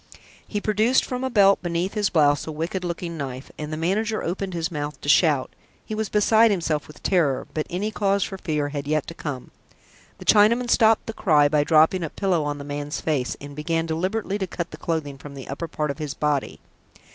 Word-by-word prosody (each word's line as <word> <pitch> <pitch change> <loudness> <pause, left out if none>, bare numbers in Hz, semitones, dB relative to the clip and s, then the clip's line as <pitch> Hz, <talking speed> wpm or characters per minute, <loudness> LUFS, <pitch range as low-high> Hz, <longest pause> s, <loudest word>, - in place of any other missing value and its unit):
He 210 - -2
produced 215 +5 +2
from 250 0 -4
a 260 - 0
belt 200 -4 +5
beneath 175 +2 -2
his 210 -2 +1
blouse 145 -3 +3
a - - -3
wicked 165 +4 -3
looking 170 -1 -4
knife, 135 -2 -6
and 150 0 -5
the 155 - -3
manager 210 +7 0
opened 185 +1 -3
his 165 +1 -2
mouth 145 -2 -4
to - - -8
shout. 145 -3 +3 0.3
He - - -6
was 215 -1 -2
beside 220 +2 +4
himself 165 -6 -1
with 150 - -15
terror, 155 -9 +1
but 155 - -2
any 195 +5 -2
cause 200 -1 +1
for 195 - -6
fear 150 -5 -1
had 145 -1 -5
yet 155 -1 +1
to - - -7
come. 145 -6 -6 0.7
The - - -11
Chinaman 235 +4 +4
stopped 225 -2 +4
the 225 - -5
cry 150 -9 +4
by 150 0 +3
dropping 160 +4 +4
a 165 - -3
pillow 180 -4 0
on 145 0 -2
the 140 - -7
man's 145 +1 -4
face, 145 -6 -1
and 145 0 -9
began 165 +2 -1
deliberately 190 +5 -2
to 190 - -2
cut 170 0 -5
the - - -9
clothing 145 -4 -3
on 145 -1 -9
the 135 - -9
upper 140 +5 -4
part 150 -2 -2
of 140 - -9
his 150 -2 -4
body. 150 -2 -1
165 Hz, 215 wpm, -24 LUFS, 145-200 Hz, 0.7 s, belt